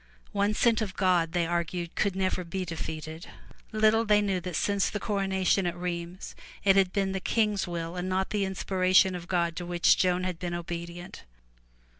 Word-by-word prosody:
One 205 +1 +1
sent 230 -1 +3
of 195 -3 -3
God 180 -3 +2
they 175 -2 +1
argued 170 0 -2
could 200 -3 0
never 185 -1 0
be 185 +2 -4
defeated. 160 0 -6 0.4
Little 220 +1 +3
they 210 -2 +4
knew 195 -3 0
that 180 -1 -5
since 200 +2 +1
the 210 - -4
corona 195 -2 -1
tion 190 0 +3
at 175 0 -3
Rheims 175 +1 -5 0.3
it 195 -1 +5
had 190 -2 +4
been 195 -1 0
the 190 - -2
King's 210 -1 0
will 170 0 -4
and 180 +1 -3
not 190 +1 -1
the 205 -2 0
inspiration 190 0 +2
of 175 -1 -7
God 170 -2 0
to 180 - -3
which 175 0 +4
Joan 180 0 +2
had 180 -3 -3
been 175 -1 -3
obedient. 170 +1 -7
185 Hz, 190 wpm, -28 LUFS, 175-195 Hz, 0.4 s, it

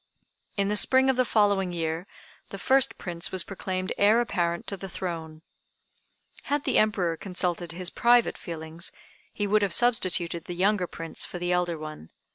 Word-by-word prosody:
In 200 0 +2
the 210 - 0
spring 260 +5 +5
of - - -3
the 255 - +3
following 200 -5 +2
year 165 +1 -3 0.4
the 195 - -7
first 265 +6 +2
Prince 175 -1 -4
was 185 -2 -1
proclaimed 185 -1 -3
heir 210 +3 +5
apparent 170 -7 -1
to 200 - -3
the 195 0 -8
throne. 165 -3 -6 1.0
Had 290 0 0
the - - +2
Emperor 190 -6 +1
consulted 175 -2 -2
his 180 0 -3
private 240 0 +4
feelings, 165 0 -6 0.4
he 205 - -2
would 210 +1 +3
have 200 -4 +2
substituted 180 -8 +2
the 175 - -6
younger 190 0 +2
Prince 165 -1 -5
for - - -6
the 175 0 -2
elder 175 -2 0
one. 155 - -8
185 Hz, 170 wpm, -27 LUFS, 170-205 Hz, 1.0 s, spring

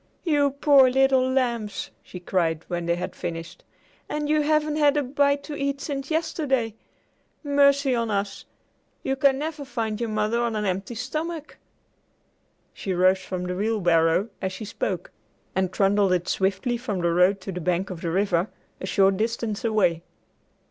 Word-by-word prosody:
"You 290 -4 +3
poor 280 -1 +5
little 265 0 +3
lambs!" 235 -6 -1
she 180 - -10
cried, 165 -3 -1
when 175 -1 -3
they 170 - +2
had 180 +1 -5
finished, 165 0 -6 0.5
"and 300 0 -2
you 305 0 +3
haven't 305 0 +1
had 295 -1 +4
a 290 - +2
bite 280 +2 +1
to 300 - -6
eat 280 -1 -2
since 275 -1 -4
yesterday! 280 -8 0 0.7
Mercy 280 -1 +3
on 230 -2 0
us! 200 -1 -2 0.6
You 270 - 0
can 270 0 +3
never 300 0 -4
find 230 -5 -3
your 235 - -1
mother 215 +2 0
on 235 -2 -1
an 210 -1 -1
empty 195 +4 -2
stomach!" 310 +6 -4 1.2
She 190 - -3
rose 185 +1 +4
from 185 -1 -5
the 180 0 -3
wheelbarrow, 180 -2 +2
as 190 - -1
she 190 +3 -7
spoke, - - -3 0.4
and 190 -1 +1
trundled 195 0 +3
it 180 0 0
swiftly 195 +5 0
from 215 -7 -3
the 170 0 +2
road 180 +3 +4
to 195 - -5
the 180 -1 -5
bank 180 +3 -1
of 175 -2 -7
the 170 - -2
river, 185 +1 +1 0.3
a 190 - -5
short 195 0 +3
distance 225 0 -2
away. 210 -7 +2
220 Hz, 170 wpm, -25 LUFS, 185-280 Hz, 1.2 s, poor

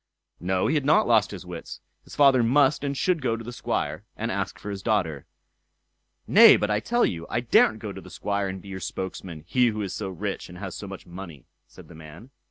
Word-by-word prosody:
No! 90 +1 0
he - - +1
had 150 -3 +1
not 145 +3 +4
lost 115 -3 +4
his 95 -3 -8
wits, 90 -2 -8 0.3
his - - -12
father 135 -3 +5
must 135 +5 +3
and 140 -1 -2
should 180 0 +1
go 115 -3 0
to 115 - -8
the 120 +2 -7
Squire, - - -3
and - - -2
ask - - -3
for 105 - -7
his 100 -1 -6
daughter. 90 - -1 1.0
"Nay, - - +8
but 105 - -1
I 105 - +2
tell 240 - +1
you, 85 -1 -4
I - - 0
daren't 115 -2 +4
go 105 -2 -6
to - - -9
the - - -13
Squire 100 -1 -2
and 95 0 -5
be 100 - -11
your 95 -1 -6
spokesman; 90 -3 -6
he 125 +7 +3
who 110 -2 -2
is 95 - -4
so 100 -2 -4
rich, 90 - -5
and 90 - -11
has 95 -1 -6
so 100 - -7
much 95 0 -9
money", 85 -6 -10 0.2
said - - -15
the - - -13
man. 80 - -13
100 Hz, 235 wpm, -25 LUFS, 90-120 Hz, 1.0 s, Nay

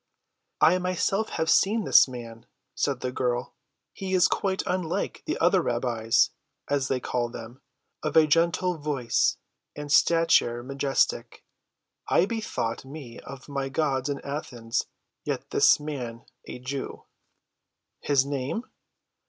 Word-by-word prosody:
"I 180 +2 +5
myself 185 +3 0
have 160 - 0
seen 215 +6 +3
this - - +6
man," 115 -3 -9 0.3
said - - -1
the 125 - -2
girl. 125 -1 -2 0.4
"He 190 -1 -3
is 180 - +5
quite 190 -1 -1
unlike 180 -3 -2
the - - -1
other - - +3
rabbis, 120 -2 +1 0.4
as 140 -2 0
they 130 -2 0
call 120 -1 -2
them—of 125 +6 -7
a 160 - +8
gentle 170 +2 +1
voice, 140 -6 +1 0.4
and 145 -1 -6
a - - +4
stature 165 -8 +4
majestic. 135 +1 -1 0.6
I 175 - +4
bethought 215 - -3
me 135 -4 -10
of 135 -1 -11
my 140 -2 -3
gods 135 -1 0
in 140 -1 -2
Athens. 125 -5 -3 0.4
Yet - - -3
is - - +6
the 150 - -11
man 125 -6 -6 0.2
a - - -6
Jew." 130 +2 -5 1.0
"His 140 -2 +2
name?" 140 - -3
140 Hz, 135 wpm, -26 LUFS, 125-165 Hz, 1.0 s, a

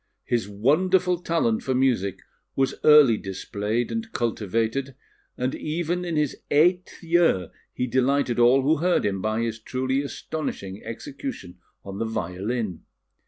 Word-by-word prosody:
His 115 -5 -1
wonderful 180 - +2
talent 165 -11 +1
for 130 - -1
music 120 -8 +1 0.3
was 135 -1 +1
early 150 -7 +7
displayed 105 +4 -3
and 225 -1 -4
cultivated, 115 +4 -1 0.4
and 125 +1 -1
even 175 +3 -2
in 170 -2 -2
his 150 -3 0
eighth 175 +5 +2
year 165 - +2 0.2
he 125 - -2
delighted 130 0 +1
all 125 +3 +5
who 155 +4 +3
heard 175 +4 +1
him 95 -2 -1
by 110 +2 0
his 115 -1 -3
truly 130 +4 -1
astonishing 140 -9 -5
execution 115 - -7 0.3
on 100 0 -7
the 115 - 0
violin. 105 -1 -3
125 Hz, 135 wpm, -25 LUFS, 110-155 Hz, 0.4 s, early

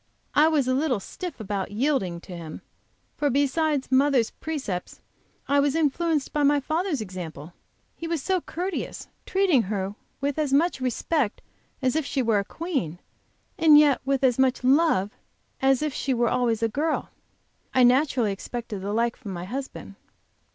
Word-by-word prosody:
"I 300 +2 +5
was 300 -5 +2
a 255 - +2
little 265 -4 +1
stiff 340 - -7
about 200 -2 -3
yielding 205 - 0
to 180 - -9
him, 165 -2 -8 0.6
for 290 - +1
besides 285 +1 +1
mother's 265 -3 +3
precepts, 265 - -5 0.5
I 285 0 +3
was 285 +1 +2
influenced 320 -1 0
by 295 - +1
my 290 0 +4
father's 310 - -1
example. 175 -5 -7 0.4
He 330 - -6
was 335 -1 -1
so 370 +5 0
courteous, 360 +4 -5 0.2
treating 375 -9 +3
her 195 -1 -3 0.3
with 285 +2 -1
as 295 -3 0
much 310 -1 +2
respect 255 0 -1 0.4
as 260 +2 +2
if 315 - +1
she 270 -1 -1
were 225 -3 +2
a - - -1
queen, 270 - -3 0.6
and 315 -2 +8
yet 295 -3 +5
with 275 0 0
as 255 -1 +3
much 260 -1 +2
love 260 - +3 0.5
as 270 +1 +3
if 295 -2 -3
were 240 -3 +2
always 235 -3 +1
a - - +4
girl. 300 +8 -2 0.6
I 255 - +4
naturally 250 -3 +3
expected 210 0 -6
the 200 +2 -3
like 235 +1 +1
from 205 -6 -8
my 175 0 -5
husband." 265 +7 -6
265 Hz, 165 wpm, -25 LUFS, 220-300 Hz, 0.6 s, and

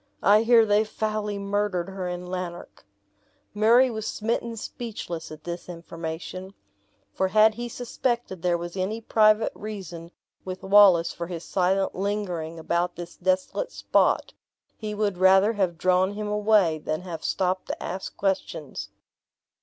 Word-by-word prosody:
I 210 +2 +6
hear 230 -1 +6
they 210 0 +3
foully 215 -1 -3
murdered 200 -2 -1
her 190 -1 -4
in 180 0 -5
Lanark." 180 - -7 0.7
Murray 235 +5 +5
was 220 -1 -4
smitten 230 +1 -2
speechless 205 -9 -6
at 155 0 -10
this 175 +1 -6
information; 170 +3 -7 0.6
for 190 - +1
had 215 +3 +5
he 240 +2 -5
suspected 240 -5 -3
there 175 0 +1
was 175 +1 -7
any 195 +4 -2
private 215 -1 +3
reason 185 -6 -7 0.3
with 185 0 -7
Wallace 190 -4 +6
for 170 - -5
his 170 -1 -6
silent 190 +1 +1
lingering 185 -5 -3
about 170 +2 -1
this 175 0 -8
desolate 185 - -1
spot, - - +1 0.4
he 215 -1 -5
would 205 -3 -1
rather 190 +3 +5
have 185 -5 0
drawn 185 +3 +2
him 210 0 -4
away 210 -6 +3
than 155 +1 -3
have 175 -3 -7
stopped 185 0 -1
to - - -5
ask 190 +1 -5
questions. 155 - -3
190 Hz, 145 wpm, -25 LUFS, 175-215 Hz, 0.7 s, I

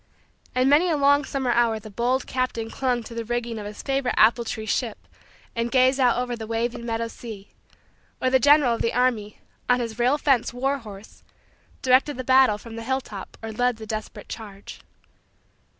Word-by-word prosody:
And 255 +1 +3
many 305 +6 +4
a 315 - +1
long 285 0 +4
summer 265 -3 -1
hour 235 -2 +2
the 215 0 -11
bold 245 +5 0
captain 255 -3 -2
clung 250 -3 -1
to 230 - -10
the 230 0 -4
rigging 235 -1 -3
of 205 - -6
his 210 - -9
favorite 270 -2 -1
apple 235 +2 +5
tree 220 -1 -5
ship 225 +1 -2 0.5
and 230 0 -1
gazed 260 +2 +3
out 245 -3 +4
over 245 0 -2
the 220 -2 -7
waving 235 +1 -2
meadow 230 0 -1
sea, 220 -4 -10 0.7
or 255 - +1
the 260 - +5
general 285 -1 +5
of 230 - -3
the 230 - 0
army, 235 -5 0 0.3
on 250 0 +4
his 230 -1 -4
rail 250 +4 +3
fence 270 -5 +2
war 270 +3 0
horse, 210 -3 -12 0.6
directed 260 +2 +3
the 255 - -4
battle 260 -4 +5
from 225 +1 -10
the 230 - -6
hilltop 245 -5 -4
or 225 - -4
led 245 +1 0
the 220 - -8
desperate 215 0 -6
charge. 205 -3 -9
240 Hz, 190 wpm, -24 LUFS, 225-260 Hz, 0.7 s, apple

